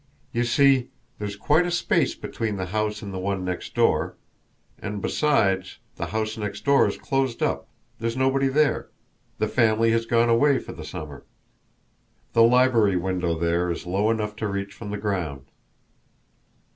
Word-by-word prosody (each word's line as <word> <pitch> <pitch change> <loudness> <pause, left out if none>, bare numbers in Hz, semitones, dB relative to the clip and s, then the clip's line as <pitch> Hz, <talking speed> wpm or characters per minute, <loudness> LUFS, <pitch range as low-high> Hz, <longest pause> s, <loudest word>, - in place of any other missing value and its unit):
"You 120 +1 +1
see, 135 0 +3 0.3
there's 105 -1 -4
quite 155 +11 +2
a - - -1
space 175 0 +1
between 110 -2 -4
the 95 - -2
house 105 0 -1
and 100 -1 -6
the 95 - -4
one 95 0 -2
next 90 -1 -5
door; - - +2 0.6
and, 105 0 -4
besides, 95 -8 +1 0.2
the - - -3
house 110 0 -2
next 105 0 -5
door 140 0 +5
is - - -3
closed 135 -3 -1
up, - - -1 0.3
there's 115 +2 -2
nobody 135 +1 +2
there, 145 +2 +1 0.5
the - - 0
family 115 0 +3
has 115 0 0
gone 115 0 +3
away 130 +4 +4
for - - -7
the - - -9
summer. 75 -3 -8 1.1
The 115 - +5
library 115 -4 +5
window 90 -2 -1
there 85 +1 0
is 85 - -4
low 100 +5 +1
enough 105 -2 -1
to 110 - -2
reach 100 0 -4
from 105 - -8
the 105 - -3
ground." 90 -10 -3
110 Hz, 165 wpm, -24 LUFS, 95-120 Hz, 1.1 s, door